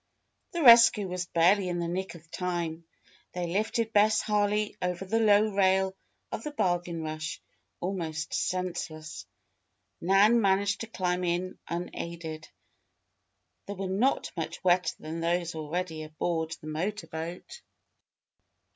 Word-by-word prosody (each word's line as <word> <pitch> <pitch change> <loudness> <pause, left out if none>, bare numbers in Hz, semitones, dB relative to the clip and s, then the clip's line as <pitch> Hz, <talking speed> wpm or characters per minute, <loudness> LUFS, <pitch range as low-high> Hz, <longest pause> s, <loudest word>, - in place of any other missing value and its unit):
The 340 -2 -1
rescue 230 -4 +8
was 180 -1 -3
barely 180 +3 +3
in 175 - -2
the 170 -1 -2
nick 185 +2 -3
of 170 0 -15
time. 170 -2 -3 0.5
They 180 -1 -2
lifted 220 +5 -1
Bess 215 +1 +5
Harley 210 0 +1
over 180 +1 -2
the 225 +4 +1
low 215 -1 +5
rail 190 -1 +3 0.4
of - - -4
the - - -3
Bargain 175 - -1
Rush, 155 0 -4 0.4
almost 165 -4 -3
senseless. 170 -4 -3 0.7
Nan 200 +6 +5
managed 200 0 +2
to 225 - -4
climb 180 -4 -1
in 180 +1 -2
unaided. 170 -2 -5 1.2
They 200 - -4
were 195 0 -5
not 215 +9 +1
much 165 -1 -5
wetter 180 -2 +3
than 160 +2 -6
those 170 +1 0
already 160 +1 -3
aboard 160 +1 -2
the - - -14
motor 180 +8 -3
boat. 175 - -7
180 Hz, 130 wpm, -29 LUFS, 165-200 Hz, 1.2 s, rescue